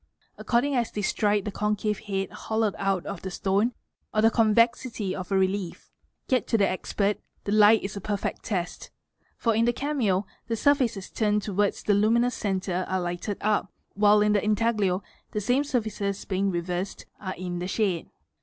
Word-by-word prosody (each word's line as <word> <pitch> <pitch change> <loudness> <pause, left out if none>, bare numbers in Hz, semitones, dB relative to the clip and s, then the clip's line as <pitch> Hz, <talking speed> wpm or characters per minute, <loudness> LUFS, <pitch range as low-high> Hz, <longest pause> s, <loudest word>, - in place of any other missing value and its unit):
according 250 +4 +1
as 235 -2 +1
they 210 - -4
strike 205 0 +1
the 210 - -2
concave 210 +1 -1
head 195 -2 -2
hollowed 220 -2 -1
out 195 -2 0
of 200 -3 -5
the 190 - -4
stone 195 +5 +1 0.5
c - - +3
the 225 +1 +5
convexity 230 -2 +2
of 185 +1 -6
a 195 - +3
relief. 190 -1 -1 0.4
Yet 255 -4 +1
to 225 - +2
the 200 -2 +3
expert, 200 +2 -1 0.2
the 200 - -3
light 215 +1 +6
is 195 +1 -4
a 200 - -5
perfect 205 0 -3
test 180 -4 -3 0.5
for 230 - +1
in 225 +2 +3
the 240 - +2
cameo 235 -9 0 0.2
the 230 - 0
surfaces 235 -6 +1
turned 210 -2 +1
towards 205 0 0
the 210 - +3
luminous 230 +4 +3
centre 190 -3 -1
at 190 - +1
lighted 175 +3 -3
up, 210 -2 +1 0.2
while 210 +1 +5
in 210 0 +3
the 205 - +2
intaglio 210 -3 +1 0.3
the 210 - 0
same 245 +7 +2
surfaces 215 -7 -2
being 195 0 0
reversed, 180 +1 -3
are 190 -2 -5
ir 180 0 -4
shade. 190 -4 -1
205 Hz, 175 wpm, -26 LUFS, 190-225 Hz, 0.5 s, light